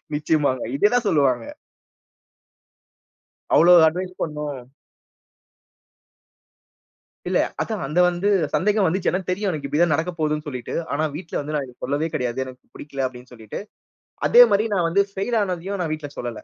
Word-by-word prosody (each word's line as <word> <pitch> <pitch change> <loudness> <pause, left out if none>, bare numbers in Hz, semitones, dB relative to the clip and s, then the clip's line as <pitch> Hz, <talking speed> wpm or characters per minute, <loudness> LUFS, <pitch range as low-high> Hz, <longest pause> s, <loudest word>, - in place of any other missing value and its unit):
நிச்சயமாங்க. 145 -4 +1
இதுதான் 235 +6 +3
சொல்லுவாங்க. 130 -6 +2 2.1
அவ்ளோ 175 +2 +7
அட்வைஸ் 180 +3 -3
பண்ணோம். 150 -4 -4 2.7
இல்ல, - - +2 0.2
அதான் - - -3
அந்த 160 +5 0
வந்து 180 +3 0 0.2
சந்தேகம் 210 0 +2
வந்துச்சு. 180 +3 +1
ஏன்னா 185 - 0
தெரியும் 200 +2 -1
எனக்கு, 145 -3 -4
இப்பிடி 150 +4 0
தான் 170 -4 +4
நடக்க 165 +3 -2
போகுதுன்னு 150 0 -1
சொல்லீட்டு. 125 -4 -6 0.2
ஆனா, 155 +2 0
வீட்ல 165 0 -7
வந்து 150 +2 -6
நான் 140 -2 -1
இது 125 - -15
சொல்லவே 145 +4 -1
கிடையாது. 125 0 -2
"எனக்கு 130 -1 -11
புடிக்கல" 140 -2 -5
அப்பிடீன்னு 125 0 -8
சொல்லிட்டு. 110 -3 -8 0.7
அதேமாரி, 225 -3 +6
நான் 175 -3 +1
வந்து 200 +4 +3
ஃபெயில் 200 +5 -2
ஆனதையும் 185 +1 -3
நான் 155 -2 -2
வீட்ல 145 -2 -7
சொல்லல. 120 -1 -3
155 Hz, 140 wpm, -22 LUFS, 140-185 Hz, 2.7 s, அவ்ளோ